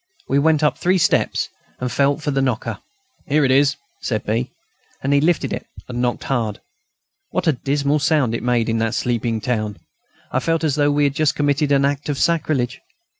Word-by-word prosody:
We 140 - +2
went 155 +1 +3
up 150 - +2
three 185 +2 +2
steps, 170 - +1 0.3
and 125 -1 -2
felt 140 +2 +1
for 145 - 0
the 135 -1 +1
knocker. 125 -4 -1 0.5
"Here 150 0 +3
it 130 - +2
is," 140 +2 +4 0.3
said - - -2
B., - - -1 0.5
and 140 +1 +1
he 140 - +4
lifted 170 +2 +1
it - - -5 0.2
and 120 -1 -3
knocked 120 -1 -1
hard. 115 -6 -1 0.7
What 185 - -2
a 160 - +4
dismal 140 +2 0
sound 140 -5 +2
it 115 - -2
made 120 -2 +1
in 115 -1 0
that 115 -1 0
sleeping 120 -2 -1
town! 110 -4 -2 0.5
I - - +1
felt 165 0 0
as 155 -3 +2
though 145 0 +2
we 145 0 +2
had 140 -1 +2
just 155 0 +1
committed 145 0 +1
an 140 -1 +4
act 145 +1 -1
of 145 - -1
sacrilege. 150 -7 0
140 Hz, 200 wpm, -21 LUFS, 125-150 Hz, 0.7 s, is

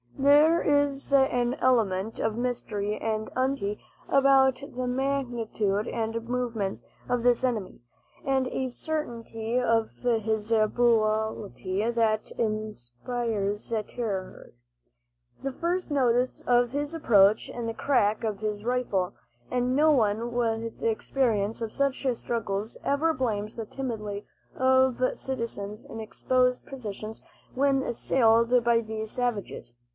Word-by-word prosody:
There 295 +4 +5
is 285 -1 +1
an 250 -2 +3
element 225 -6 +1
of 220 -1 0
mystery 215 -4 -2
and 220 -1 -2
uncertainty 255 -6 -1 0.2
about 270 -1 +4
the 250 0 -2
magnitude 240 -6 -1
and 230 0 -3
movements 235 -5 -2 0.3
of 245 -1 0
this 245 0 +3
enemy, 220 - -2 0.4
and 265 -1 +1
a 260 +1 -2
certainty 240 -5 -3
of 230 -2 +2
his 220 -3 0
brutality, 215 -2 +1
that 225 -2 +1
inspires 215 - -3 0.2
terror. 200 -6 -5 0.9
The 275 - -1
first 345 +4 -2
notice 250 -2 +1
of 245 0 +4
his 290 +3 -2
approach 210 -9 +4
is 240 -1 -5
the 230 - -2
crack 220 -6 +1
of 215 -3 -2
his 210 -1 -3
rifle, 240 -7 0 0.4
and 250 +1 0
no 310 +2 +5
one 230 -3 +1
with 230 -1 -2
experience 225 -2 0
of 225 -1 -3
such 275 -1 -1
struggles 220 -2 -3
ever 310 +4 +2
blames 215 -6 -2
the 225 - -5
timidity 210 -5 -5 0.3
of 260 -1 +3 0.2
citizens 230 -5 -4
in 225 - -8
exposed 250 +3 0
positions 220 -4 -7 0.3
when 270 0 +3
assailed 235 -1 +3
by 235 -1 +3
these 220 -1 -5
savages. 225 - -3
235 Hz, 120 wpm, -27 LUFS, 215-255 Hz, 0.9 s, There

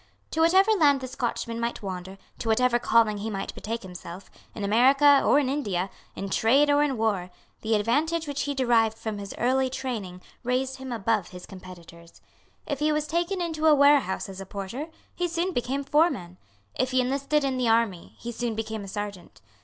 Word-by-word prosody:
To 320 - 0
whatever 380 +6 +5
land 295 -9 +4
the 260 - -6
Scotchman 240 -2 -3
might 235 -2 -3
wander, 190 0 -6 0.2
to 230 - -5
whatever 240 +2 +3
calling 225 -3 +3
he 215 +2 -4
might 195 -2 -4
betake 230 +1 -5
himself, 180 0 -10 0.2
in 210 - -5
America 270 +7 +5
or - - +4
in 290 -3 +2
India, 200 -10 -2 0.2
in 195 - -5
trade 275 +6 +4
or 290 0 +4
in 285 -4 0
war, 205 -5 0 0.3
the 220 0 +1
advantage 300 +10 0
which 285 -1 -3
he 285 - -2
derived 230 -4 +2
from 215 -2 -5
his 200 -1 -7
early 260 +2 +1
training 215 -9 -5 0.2
raised 255 +2 -1
him 265 -1 -7
above 225 -3 0
his 180 0 -10
competitors. 170 -3 -13 0.5
If 285 - -3
he 305 +1 +2
was 300 0 0
taken 345 +4 -1
into 320 -2 -1
a 305 - +7
warehouse 280 -8 +3
as 195 0 -8
a - - -7
porter, 200 +10 -5 0.3
he 355 - -1
soon 345 +2 -2
became 260 +2 -2
foreman. 275 - +1 0.3
If 255 - -1
he 255 0 +1
enlisted 275 +3 0
in 265 -1 -1
the 250 -2 +1
army, 225 -6 0
he 235 - -6
soon 235 -1 -3
became 220 -1 -4
a - - -8
serjeant. 200 - -7
240 Hz, 195 wpm, -26 LUFS, 205-285 Hz, 0.5 s, a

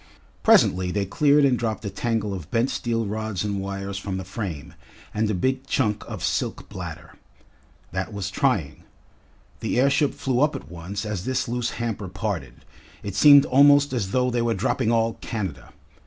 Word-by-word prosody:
Presently 90 0 +4
they 100 +2 -1
cleared 145 +8 +4
and 130 -3 +2
dropped 110 -2 -3
a 100 - -3
tangle 110 -1 -1
of 90 -4 -7
bent 115 +5 +1
steel 115 -1 -1
rods 110 -2 -3
and 100 -1 -2
wires 100 0 -4
from 95 -1 -4
the 95 - -4
frame, 95 -6 -6 0.4
and 110 0 0
a 105 - 0
big 130 +7 -1
chunk 105 -7 0
of - - -6
silk - - -2
bladder. - - -8 0.8
That 95 +3 -3
was 100 -3 -4
trying. - - 0 0.8
The - - -1
airship 140 +2 +2
flew 130 -2 -1
up 150 +1 +2
at - - -8
once 95 +5 -5
as 105 -4 -4
this 130 0 -1
loose 120 0 -1
hamper 110 -4 -3
parted. 90 - -5 0.4
It 100 - -5
seemed 145 +6 +7
almost 145 +1 +5
as 110 -7 -1
though 125 +4 +1
they 120 0 0
were 115 -1 +1
dropping 115 +3 0
all 115 0 +1
Canada. 95 - -5
110 Hz, 175 wpm, -24 LUFS, 95-125 Hz, 0.8 s, seemed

